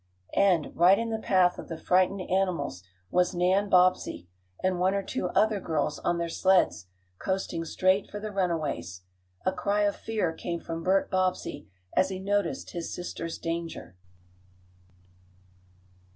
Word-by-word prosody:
And, 185 -6 +2
right 180 +4 +6
in 230 0 -2
the 220 - -1
path 185 -4 +3
of - - -8
the 165 - -5
frightened 185 +3 +2
animals 180 - -1 0.3
was 180 0 +2
Nan 185 +3 +2
Bobbsey, 180 - +3 0.4
and 185 -1 +1
one 190 +2 +2
or 200 - -1
two 180 - -2
other 215 +1 +3
girls, 155 -4 -1
on 175 - 0
their 170 0 -1
sleds, 165 - +2 0.3
coasting 190 -3 -2
straight 185 +4 +1
for 205 - -6
the 215 0 -5
runaways. 155 - -2 0.4
A 185 - +3
cry 200 +2 0
of 205 -1 +2
fear 210 -7 -2
came 170 +1 -4
from 165 0 -5
Bert 190 +3 +2
Bobbsey 185 - -1 0.3
as 190 - +3
he 190 - -4
noticed 200 -1 -1
his 170 -2 -5
sister's 165 -2 -5
danger. 165 - -5
185 Hz, 150 wpm, -28 LUFS, 165-195 Hz, 0.4 s, right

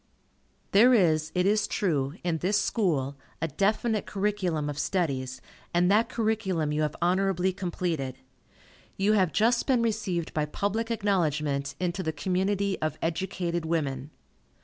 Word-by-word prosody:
There 240 +5 +6
is, 160 -6 +2
it 180 0 +2
is 205 +1 +2
true, 150 -7 0
in 170 -2 0
this 200 +5 +2
School, 145 - 0 0.2
a 165 - -1
definite 210 - 0
curriculum 190 -7 -1
of 145 0 -4
studies, 135 -7 -1 0.3
and 180 +2 +4
that 215 +3 +3
curriculum 210 -9 0
you 150 +1 0
have 150 -1 -1
honorably 185 0 +2
completed. 170 -8 -3 0.8
You 200 +2 +3
have 190 -6 +3
just 230 +2 +2
been 250 -4 +3
received 200 -7 -1
by 150 -1 0
public 205 +8 -2
acknowledgment 150 -10 0
into 180 +1 -1
the 160 -3 -1
community 190 +5 -1
of 155 -1 -1
educated 170 0 -2
women. 145 -4 -2
180 Hz, 140 wpm, -27 LUFS, 155-205 Hz, 0.8 s, There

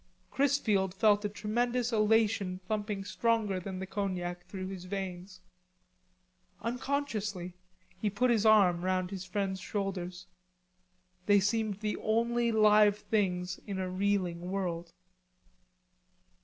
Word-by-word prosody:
Chrisfield 220 -9 +1
felt 205 +1 +4
a - - 0
tremendous 240 +4 -1
elation 215 -3 +2
thumping 210 -2 -2
stronger 215 -2 0
than 185 +1 -6
the 190 - -4
cognac 180 -3 -3
through 185 0 -6
his 185 -2 -7
veins. 185 -1 -6 1.2
Unconsciously 230 -7 -2 0.5
he 210 - 0
put 240 +5 +1
his 220 -3 +2
arm 195 -6 +5
round 185 0 0
his 190 -2 -5
friend's 190 0 -2
shoulders. 185 -3 -4 1.0
They 205 -1 +6
seemed 210 0 0
the 210 -1 -1
only 235 +2 +1
live 210 -1 +5
things 180 -4 -1
in 200 -2 -3
a 185 -1 -2
reeling 185 -3 -1
world. 175 -3 -3
200 Hz, 115 wpm, -31 LUFS, 185-215 Hz, 1.2 s, They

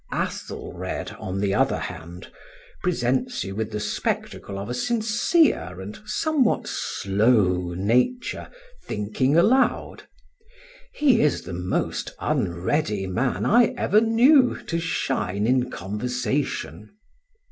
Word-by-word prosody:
Athelred, - - -4
on 95 +1 -4
the 100 -1 +1
other - - +2
hand, 85 +2 -8 0.5
presents 180 - 0
you 95 - -6
with 110 +1 -3
the 105 - -4
spectacle 105 -1 -3
of 100 +1 -5
a 120 - -3
sincere 220 - +1
and 100 +3 -8
somewhat 285 +2 +1
slow 95 -4 +1
nature 125 - 0 0.3
thinking 110 +8 0
aloud. 250 +10 +2 0.8
He 270 -6 +3
is 150 - +1
the 90 - -7
most 90 +1 -2
unready 95 - -1
man 95 +8 -1
I 235 +1 +4
ever 210 +2 +3
knew 250 +4 +5
to 165 - -2
shine 105 - -1
in 125 +1 +2
conversation. 120 +2 -3
125 Hz, 110 wpm, -24 LUFS, -, 0.8 s, knew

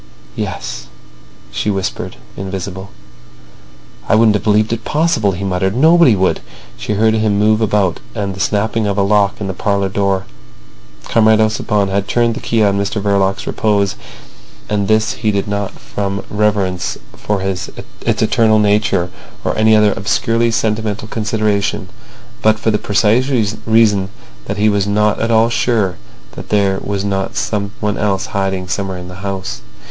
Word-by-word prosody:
"Yes," 60 - -5 0.6
she - - -2
whispered, 95 -2 -3 0.2
invisible. 95 0 -5 1.2
"I - - +5
wouldn't 110 -1 +5
have 105 - -1
believed 110 +1 +2
it 115 -1 -4
possible," 150 -10 +1
he 90 +2 -5
muttered. 95 +1 0
"Nobody 160 -2 +5
would." 95 -1 +1 0.4
She - - -3
heard 110 +2 +3
him 110 -2 +1
move 110 +1 +3
about 100 -5 +1 0.2
and 100 -3 -2
the 95 - -10
snapping 110 +1 0
of 100 0 -1
a 100 - +3
lock 100 0 +2
in 105 - -3
the 95 - -3
parlour 100 +1 0
door. 95 -1 0 0.8
Comrade 110 -1 +3
Ossipon 105 -2 +1
had 100 +1 -1
turned 120 +2 +2
the - - -5
key 115 -2 +1
on 100 -1 +2
Mr 100 +1 -1
Verloc's 100 -1 0
repose; 100 -2 +1 0.7
and 100 -2 -1
this 110 +2 +2
he 110 -4 -1
did 100 -1 -1
not 100 -1 -2
from 100 -1 -4
reverence 105 -4 0 0.2
for 105 -1 -2
its 95 -1 -3 0.3
eternal 110 -1 +2
nature 105 -4 +2 0.3
or - - 0
any 110 0 +4
other 105 -1 +4
obscurely 115 +4 +1
sentimental 110 -1 -1
consideration, 105 -2 -1 0.5
but 110 0 +3
for 110 0 0
the 105 - 0
precise 110 +5 +2 0.4
reason 105 -4 +3 0.4
that 100 - -4
he 105 +1 +3
was 100 -2 +1
not 105 +1 +1
at 115 - 0
all 115 0 +4
sure 110 -6 +1 0.3
that - - -10
there 100 -2 +2
was 100 -1 -2
not 95 -1 -2
someone 105 0 -2
else 100 -2 0
hiding 95 -1 -1
somewhere 95 +1 -3
in 90 0 -8
the 90 0 -9
house. 100 -1 -4
105 Hz, 160 wpm, -16 LUFS, 100-110 Hz, 1.2 s, I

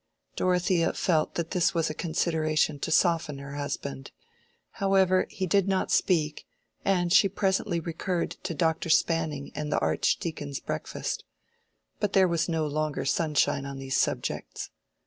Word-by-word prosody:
Dorothea 180 -1 +2
felt 160 -4 +1
that 170 -1 -3
this 175 -1 +2
was 165 -2 +1
a - - -4
consideration 155 -2 0
to - - -3
soften 165 -3 +2
her 140 0 -8
husband. 105 - -5 0.7
However, 190 -1 +3
he 190 - -3
did 195 +2 +2
not 190 -1 0
speak, 155 -5 +1 0.4
and 175 -3 +2
she 195 - +6
presently 190 -2 0
recurred 170 +2 -2
to 165 - -4
Dr. 160 +1 0
Spanning 160 -3 +1
and 150 0 -4
the - - +2
Archdeacon's 145 -4 -1
breakfast. - - -4 0.8
But 205 -2 -1
there 190 -1 +5
was 170 0 0
no 160 -2 0
longer 150 0 -2
sunshine 145 -2 +1
on 140 -1 -6
these 135 0 -3
subjects. - - -2
165 Hz, 145 wpm, -27 LUFS, 150-180 Hz, 0.8 s, she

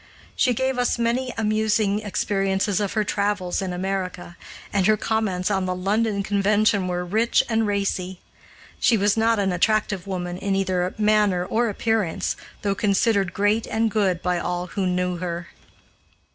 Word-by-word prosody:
She 250 -3 +2
gave 260 +1 0
us 245 - +1
many 240 +2 0
amusing 215 -1 +1
experiences 195 0 0
of 205 -2 -2
her 215 - +1
travels 200 -3 -1
in 190 -1 -3
America, 180 -1 -4 0.4
and 195 -1 +2
her 215 0 +4
comments 210 -4 -1
on 190 -2 0
the 185 - -1
London 200 +2 0
Convention 205 0 +2
were 180 0 -2
rich 220 +6 +2
and 225 -1 +1
racy. 195 -2 -2 0.6
She 230 - +4
was 205 0 +2
not 225 0 +2
an 195 -2 +1
attractive 200 0 0
woman 180 -2 -4
in 195 0 -1
either 185 -1 0
manner 210 -4 +2
or 230 +4 0
appearance, 215 -4 -1 0.3
though 200 -1 +1
considered 200 -1 +1
great 205 +3 +1
and 225 0 0
good 190 -5 0
by 180 -1 0
all 180 +1 -2
who 195 -2 0
knew 180 0 -1
her. 170 -1 -5
200 Hz, 160 wpm, -23 LUFS, 185-215 Hz, 0.6 s, her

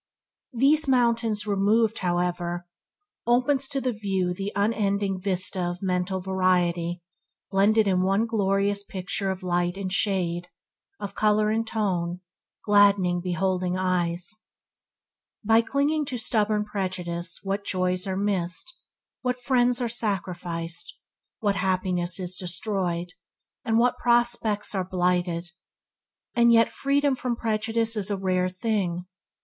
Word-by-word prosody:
These 285 +5 +4
mountains 235 -4 +2
removed, 210 +2 +2
however, 175 -1 -1 0.6
there 240 - +5
opens 270 +2 +1
to 275 0 -2
the 255 -2 -1
view 195 -4 -1
the 195 +3 -4
unending 200 -2 0
vista 185 -1 +1
of 175 +1 -3
mental 185 0 0
variety 180 -2 0 0.5
blended 210 +2 +4
in 185 -2 +2
one 195 +4 +2
glorious 200 -2 +1
picture 195 0 -3
of 190 0 -4
light 175 0 0
and 190 -2 -3
shade, 175 -4 0 0.5
of 200 - -5
colour 215 0 +2
and 225 +1 0
tone, 180 -5 -1 0.4
gladdening 200 -4 +4
beholding 185 0 -1
eyes. 180 +2 -1 1.0
By 225 +2 +5
clinging 285 +5 0
to 265 -3 -4
stubborn 215 -2 +1
prejudice 180 -4 -4
what 195 +1 -2
joys 185 -1 0
are 190 -1 -2
missed, 195 - -2 0.4
what 250 0 -1
friends 245 -1 +2
are - - 0
sacrificed, 175 -7 -3 0.4
what 200 -2 +1
happiness 185 -1 0
is 180 0 -3
destroyed, 180 -1 -2 0.5
and 225 -4 +1
what 245 +1 +2
prospects 235 -4 +1
are 190 -2 0
blighted! 180 -1 -1 0.8
And 235 0 +5
yet 230 -1 +5
freedom 280 0 +1
from 250 -2 -2
prejudice 225 0 0
is 210 -2 -1
a 200 - -1
rare 185 -1 0
thing. 185 -3 -2
195 Hz, 125 wpm, -26 LUFS, 180-225 Hz, 1.0 s, there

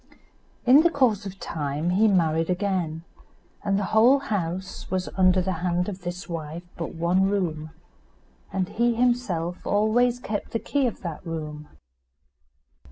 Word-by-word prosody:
In 260 +5 +8
the 340 - +4
course 235 - +1
of 195 0 -9
time 150 +2 -2
he 210 +5 +4
married 165 -4 +2
again, 180 -4 -1 0.6
and 200 -1 +1
the 205 - 0
whole 235 +5 +6
house 190 -8 -4
was 185 -1 -1
under 185 -1 +4
the 190 - -1
hand 180 0 0
of 195 -2 -5
this 175 +1 -6
wife 165 -1 -5
but 165 -1 -5
one 180 +4 +2
room, 160 -6 -2 0.8
and 190 -1 -1
he 235 +3 +1
himself 225 -9 0
always 235 +4 +2
kept 210 -4 -4
the 230 - 0
key 280 +1 0
of 230 - -5
that 170 -5 -6
room. 150 -3 -6
185 Hz, 150 wpm, -25 LUFS, 170-215 Hz, 0.8 s, In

